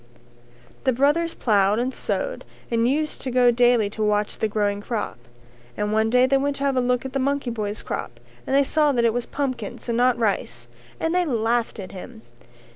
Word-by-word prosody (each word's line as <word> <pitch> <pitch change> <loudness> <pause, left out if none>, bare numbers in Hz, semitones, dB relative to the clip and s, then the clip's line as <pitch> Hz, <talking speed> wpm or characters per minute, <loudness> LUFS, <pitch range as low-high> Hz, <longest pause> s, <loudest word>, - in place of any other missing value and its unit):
The 260 - +2
brothers 295 +6 +1
ploughed 205 -2 +2
and 250 +3 -1
sowed - - -3 0.3
and 230 0 +2
used 300 +4 -1
to 265 - -3
go 245 -1 +4
daily 240 -2 +3
to 220 - -6
watch 210 0 0
the 220 - +1
growing 205 -1 -1
crop, 210 - -4 0.6
and 210 0 -1
one 220 +1 +2
day 250 +2 +5
they 270 +1 +3
went 280 +1 0
to 280 - -5
have 275 -1 +1
a 255 - +2
look 250 +1 0
at 265 - -6
the 275 - 0
monkey 275 -1 0
boy's 210 -2 -4
crop - - -5 0.3
and 270 - +1
they 280 - +5
saw 300 +1 +2
that 235 -2 +2
it 230 - +3
was 245 0 -3
pumpkins 255 -8 -4
and 235 - 0
not 250 0 +3
rice 205 - -1 0.3
and 325 +1 0
they 360 0 +3
laughed 235 -5 0
at 185 -2 -7
him. 220 +4 -10
245 Hz, 205 wpm, -23 LUFS, 220-275 Hz, 0.6 s, day